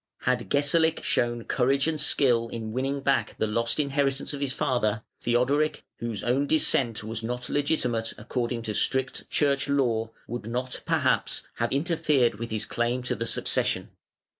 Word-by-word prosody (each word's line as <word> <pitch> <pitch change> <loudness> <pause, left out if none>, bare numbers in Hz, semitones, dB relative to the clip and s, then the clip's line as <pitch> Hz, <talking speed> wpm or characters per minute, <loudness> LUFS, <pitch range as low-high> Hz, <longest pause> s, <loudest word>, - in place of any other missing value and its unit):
Had 125 -1 0
Gesalic 160 +3 +2
shown 120 -1 0
courage 135 +4 +1
and 155 -2 0
skill 120 -5 +3
in 115 -2 -5
winning 135 +4 -1
back 135 -1 +1
the - - +1
lost 115 +5 +1
inheritance 140 -1 0
of 145 - -5
his 140 -2 0
father, 120 -6 0 0.2
Theodoric, 135 +6 +1 0.2
whose 115 -4 -4
own 135 +4 +1
descent 120 -7 +2
was 110 +1 -3
not 125 +2 -3
legitimate 125 -6 0
according 120 +1 -3
to 110 - -3
strict 130 +5 0
church 140 -1 +1
law, 120 -5 +1 0.2
would 120 -2 -5
not, 125 +2 -3
perhaps, - - +1
have - - 0
interfered 145 -6 +1
with 115 0 -4
his 110 0 -2
claim 120 +1 -1
to 130 - -1
the 115 +2 -3
succession. - - 0
125 Hz, 160 wpm, -27 LUFS, 115-140 Hz, 0.2 s, skill